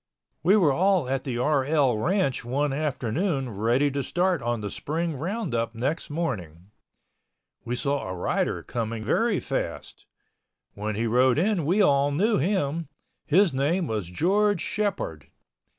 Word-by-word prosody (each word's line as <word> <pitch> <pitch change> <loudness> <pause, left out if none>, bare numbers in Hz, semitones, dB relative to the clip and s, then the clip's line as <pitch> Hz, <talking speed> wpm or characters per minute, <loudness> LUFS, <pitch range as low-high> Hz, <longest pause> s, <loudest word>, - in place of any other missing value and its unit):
We 185 +8 +5
were 160 -9 +4
all 185 -2 +2
at 135 0 -2
the 125 -3 -2
RL 140 -1 +2
ranch 155 - 0
one 135 +4 -1
afternoon 140 - -1
ready 120 +8 +1
to 140 +1 -1
start 180 +6 0
on 120 -1 -2
the 105 -1 -4
spring 165 +1 -2
roundup 145 - -2
next 140 +9 -2
morning. 100 - -4 0.9
We 120 - -2
saw 140 -4 -1
a 95 - -4
rider 90 - -1
coming 115 -1 -4
very 215 - +1
fast. - - -5 0.7
When 105 +1 -4
he 115 +3 -1
rode 125 +3 +3
in 185 -1 +1
we 190 +7 +3
all 140 -4 +3
knew 205 +10 +2
him. 165 -2 0 0.4
His 175 +1 +4
name 155 +7 +1
was 105 - -3
George 195 - +2
Shepord. 195 - -2
140 Hz, 145 wpm, -26 LUFS, 120-175 Hz, 0.9 s, We